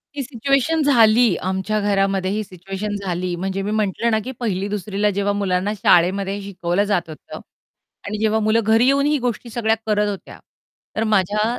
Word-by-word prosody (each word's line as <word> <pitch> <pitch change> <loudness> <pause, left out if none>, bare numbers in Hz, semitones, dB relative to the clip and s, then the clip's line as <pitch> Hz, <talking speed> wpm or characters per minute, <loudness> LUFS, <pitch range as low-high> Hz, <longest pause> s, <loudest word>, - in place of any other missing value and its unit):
ही 285 - -2
situation 275 +5 0
झाली 235 -6 +5
आमच्या 190 +3 -1
घरामध्ये. 195 -2 0
ही 215 +1 -1
सिच्युएशन 195 +2 -6
झाली 180 0 -2
म्हणजे, 190 +2 -3
मी 200 +2 -3
म्हटलं 215 +2 0
ना, 220 - +2
की 260 - -5
पहिली-दुसरीला 205 -1 -1
जेव्हा 200 +1 0
मुलांना 200 0 -1
शाळेमध्ये 195 +2 +2
शिकवलं 190 -1 -1
जात 175 -5 0
होतं. 155 - -10 0.7
आणि 210 +1 -4
जेव्हा 220 0 +2
मुलं 215 +1 +2
घरी 225 +3 +3
येऊन 280 +1 +3
ही 295 0 +2
गोष्टी 245 -1 -3
सगळ्या 225 -1 +1
करत 210 -1 +1
होत्या, 200 -2 -8 0.6
तर 220 - 0
माझ्या 210 -1 +1
205 Hz, 165 wpm, -20 LUFS, 190-220 Hz, 0.7 s, झाली